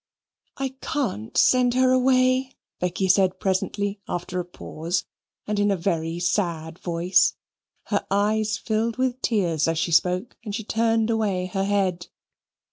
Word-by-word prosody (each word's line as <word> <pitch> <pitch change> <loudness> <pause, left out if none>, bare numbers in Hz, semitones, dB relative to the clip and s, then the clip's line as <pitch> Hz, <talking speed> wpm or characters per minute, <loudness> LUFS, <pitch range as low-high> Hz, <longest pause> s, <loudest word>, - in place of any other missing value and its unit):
"I 270 0 -1
can't 240 - -3
send 250 -1 +4
her 255 0 +4
away," 255 0 +3 0.2
Becky 180 +2 -1
said 185 0 +3
presently, 200 +1 -1
after 175 +1 -3
a 175 - -3
pause, 175 0 -4 0.4
and 210 -1 -1
in 205 0 +3
a 200 - +1
very 165 -2 -1
sad 170 -3 -1
voice. 175 +1 +2 0.5
Her - - -2
eyes 215 +2 +1
filled 225 +1 -1
with 255 0 -1
tears 170 -9 +1
as 165 0 0
she 170 - 0
spoke, 180 +6 +2
and 205 -3 -4
she 220 - -4
turned 225 +1 +1
away 205 -5 0
her 195 -1 0
head. 190 -3 0
200 Hz, 145 wpm, -24 LUFS, 180-230 Hz, 0.5 s, send